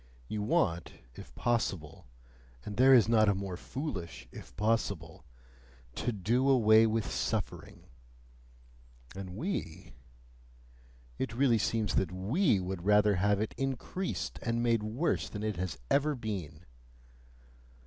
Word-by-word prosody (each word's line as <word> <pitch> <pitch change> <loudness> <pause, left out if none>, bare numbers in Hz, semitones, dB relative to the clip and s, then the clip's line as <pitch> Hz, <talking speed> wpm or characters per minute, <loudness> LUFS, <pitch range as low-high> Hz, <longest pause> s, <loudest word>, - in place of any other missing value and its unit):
You 105 - -3
want, 105 - 0 0.2
if - - -11
possible 95 - -2 0.6
and 105 - -5
there 130 +4 +6
is 120 -5 +7
not 110 -2 +4
a 100 - +2
more 95 -1 -4
foolish 95 - -6
"if - - -12
possible" 100 -9 -1 0.7
TO 120 - -2
DO 120 +6 +1
AWAY 110 -3 +6
WITH 110 -1 0
SUFFERING; - - -3 1.3
and 95 -2 -7
we? 150 - -4 1.3
it 110 - -3
really 120 -3 +3
seems 110 -1 0
that 90 -3 +1
WE 110 - +1
would 90 -1 -4
rather 105 0 +4
have 100 +2 +2
it 110 - -2
increased 135 +8 -3
and 115 0 -1
made 115 -2 +2
worse 115 +10 -1
than 105 -1 -6
it 105 -4 -2
has 90 -5 -3
ever 145 +1 +3
been! 95 - -6
110 Hz, 130 wpm, -31 LUFS, 95-120 Hz, 1.3 s, is